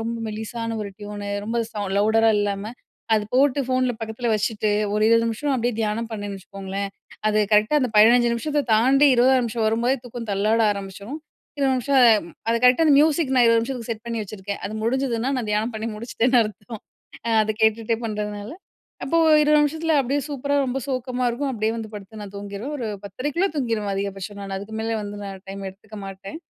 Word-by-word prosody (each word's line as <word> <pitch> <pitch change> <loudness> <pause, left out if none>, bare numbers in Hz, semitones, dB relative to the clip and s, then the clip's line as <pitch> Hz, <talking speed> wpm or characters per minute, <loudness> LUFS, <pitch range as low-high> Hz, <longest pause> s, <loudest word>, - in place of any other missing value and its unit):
ரொம்ப 230 +1 -3
மெலிசான 225 +1 -4
ஒரு 200 - -5
ட்யூனு 205 0 -6 0.2
ரொம்ப 225 +2 -3 0.2
சவுண் 205 -2 -3
லவுடரா 220 +2 +4
இல்லாம 205 +1 -2 0.4
அது 210 -1 +1
போட்டு 275 +2 +3
ஃபோன்ல 255 0 +1
பக்கத்ல 225 +2 -3
வச்சுட்டு, 215 0 -1 0.2
ஒரு 210 - +1
20 230 0 +4
நிமிஷம் 265 +5 -1
அப்டியே 245 0 0
தியானம் 220 +2 -1
பண்ணேன்னு 205 -2 -5
வச்சுக்கோங்களேன், 195 +1 -5 0.4
அது 215 0 +2
கரெக்ட்‌டா 215 +8 +4
அந்த 255 - +1
15 240 +3 +6
நிமிஷத்த 290 +5 -1
தாண்டி 265 +6 +5
20ஆவது 255 +1 +4
நிமிஷம் 230 -1 -2
வரும்போதே 235 +4 +1
தூக்கம் 235 -1 -7
தள்ளாட 210 +3 +2
ஆரம்பிச்சரும். 200 +8 -7 0.4
20 270 -2 +2
நிமிஷம் 270 +2 +2 0.3
ம் 170 - -12 0.2
அது 230 - +3
கரெக்ட்‌டா 250 +6 +5
அந்த 290 - +6
மியூசிக் 305 -2 +2
நான் 245 - +6
20 230 0 +5
நிமிஷத்துக்கு 240 -1 -5
செட் 225 0 -5
பண்ணி 230 -1 -2
வச்சுருக்கேன். 200 0 -6
அது 210 - -6
முடிஞ்சுதுனா 250 +1 0
நான் 230 -4 -3
தியானம் 215 +3 0
பண்ணி 220 +1 -3
முடிச்சிட்டேன்னு 240 +2 +2
அர்த்தம். 215 +1 -8 0.4
அ 230 - 0
அத 215 - -1
கேட்டுட்டே 220 +1 +2
பண்றதுனால 210 +1 -4 0.5
அப்போ 330 +5 +1 0.2
20 300 0 +4
நிமிஷத்ல 320 +2 0
அப்டியே 275 +2 0
சூப்பரா 285 0 -1
ரொம்ப 255 +1 -2
சோக்கமா 255 -1 -2
இருக்கும். 270 +4 -2
அப்டியே 220 -2 0
வந்து 225 -1 -5
படுத்து 210 +1 -9
நான் 200 - -9
தூங்கிருவேன். 205 +7 -6
ஒரு 235 - -3 0.2
10:30குள்ள 290 - -1
தூங்கிருவேன் 225 -6 -1
அதிகபட்சம். 195 +1 -4
நான் 195 -1 -5
அதுக்கு 205 +3 -9
மேல 225 0 -1
வந்து 205 0 -6
நான் 195 -1 -7
டைம் 195 0 -6
எடுத்துக்க 210 +3 -14
மாட்டேன். 195 +8 -8
225 Hz, 185 wpm, -23 LUFS, 210-255 Hz, 0.5 s, 15